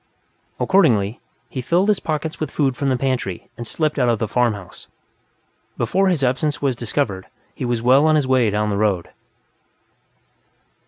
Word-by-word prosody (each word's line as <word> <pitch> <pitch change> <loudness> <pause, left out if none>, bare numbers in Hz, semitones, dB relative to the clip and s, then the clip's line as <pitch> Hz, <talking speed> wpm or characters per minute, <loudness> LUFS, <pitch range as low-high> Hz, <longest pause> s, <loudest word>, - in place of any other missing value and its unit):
Accordingly, 120 - +2 0.3
he 130 - -5
filled 175 +10 +1
his 210 - +3
pockets 155 0 -3
with 155 - -2
food 140 -3 0
from 140 0 -1
the 130 - +1
pantry 125 -8 -3
and 120 - -7
slipped 155 +1 -1
out 125 -2 +3
of 115 - +2
the 110 - -2
farmhouse; 105 -5 -2 0.9
before 195 +1 +1
his 170 -7 +1
absence 140 +4 0
was 135 -3 0
discovered 115 -5 -2 0.3
he - - -5
was 120 -2 -1
well 135 +5 +5
on 155 - +4
his 150 -3 +2
way 130 -4 +3
down 105 +1 0
the 100 - -1
road. 100 -5 0
130 Hz, 165 wpm, -21 LUFS, 110-150 Hz, 0.9 s, well